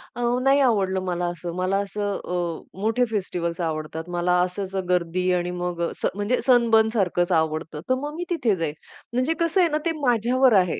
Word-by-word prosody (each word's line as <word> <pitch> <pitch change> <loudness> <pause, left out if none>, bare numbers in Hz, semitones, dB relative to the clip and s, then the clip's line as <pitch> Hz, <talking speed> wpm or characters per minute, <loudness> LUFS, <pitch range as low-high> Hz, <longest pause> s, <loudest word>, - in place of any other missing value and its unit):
अ, 245 - -4 0.2
नाही 275 +1 +4
आवडलं 195 -7 +2
मला 175 0 -1
असं 175 0 -6
मला 185 +2 0
असं 205 0 -2
अ, 175 -1 -4
मोठे 225 +4 +2
फेस्टिव्हल्स 175 -4 -2
आवडतात. 160 0 -3
मला 175 0 +1
असच 185 +2 -3
अ, - - +1
गर्दी 180 +1 +1
आणि 175 0 0
मग 175 -1 -3
अ, - - -8
स - - 0
म्हणजे 205 +5 0
सनबर्न 230 -3 +5
सारखंच 180 -4 +1
आवडतं 160 -2 0
तर 255 - +4
मग 290 +3 -5
मी 350 - -3
तिथे 250 - +1
जाईल 165 -4 -2 0.4
म्हणजे 255 +6 +1
कसं 335 +3 +2
आहे 345 - +4
ना 305 - +1
ते 335 - +2
माझ्यावर 250 0 +3
आहे, 180 -2 0
190 Hz, 195 wpm, -24 LUFS, 175-245 Hz, 0.4 s, सनबर्न